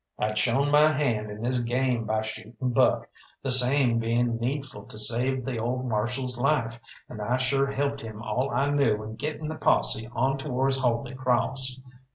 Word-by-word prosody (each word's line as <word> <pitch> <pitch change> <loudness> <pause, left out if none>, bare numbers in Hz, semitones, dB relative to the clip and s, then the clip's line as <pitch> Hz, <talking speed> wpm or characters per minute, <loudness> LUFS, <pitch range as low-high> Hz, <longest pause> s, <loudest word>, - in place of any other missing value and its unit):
I'd 110 0 -1
shown 130 +6 +1
my 150 +1 +6
hand 120 -8 -1
in 105 +2 -8
this 125 +1 0
game 120 -1 0
by 110 0 -1
shooting 110 +1 -8 0.2
Buck, 120 - +2 0.4
the 135 - 0
same 125 -1 +5
being 115 +1 0
needful 130 -4 -4
to 110 - -11
save 120 +4 +1
the 125 -4 -3
old 125 +3 -2
Marshal's 120 +3 -2
life, 120 -4 0 0.3
and 110 - -8
I 120 +4 0
sure 135 +2 +1
helped 140 0 -2
him 110 -3 -8
all 120 +4 -2
I 140 +4 0
knew 115 -7 +1
in 110 +1 -7
getting 155 +2 -4
the 155 0 -6
posse 110 -5 +3
on 135 +3 0
towards 135 -1 0
Holy 125 +1 0
Crawss. 130 0 0
125 Hz, 180 wpm, -26 LUFS, 115-135 Hz, 0.4 s, my